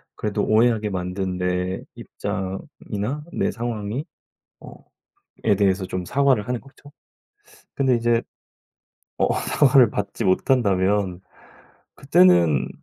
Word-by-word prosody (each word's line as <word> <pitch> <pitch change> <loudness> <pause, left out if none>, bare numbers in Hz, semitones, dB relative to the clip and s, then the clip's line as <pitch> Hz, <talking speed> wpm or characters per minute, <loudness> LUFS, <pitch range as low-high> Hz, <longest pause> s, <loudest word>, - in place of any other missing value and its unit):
그래도 105 -1 -2
오해하게 110 -1 +2
만든 90 0 -3
내 90 +1 -2
입장이나 100 +7 -5
내 - - 0
상황이 115 +3 -4 0.6
어 - - -11 0.7
에 105 - +4
대해서 95 -1 +1
좀 90 0 -4
사과를 135 -3 +2
하는 125 -1 -2
거죠. 140 +1 -18 0.8
근데 135 -2 +2
이제 120 0 +1 1.0
어 - - +2
사과를 130 -4 +4
받지 105 +2 -3
못한다면 95 -3 +1 0.7
그때는 85 -8 +4
105 Hz, 225 characters per minute, -22 LUFS, 95-120 Hz, 1.0 s, 에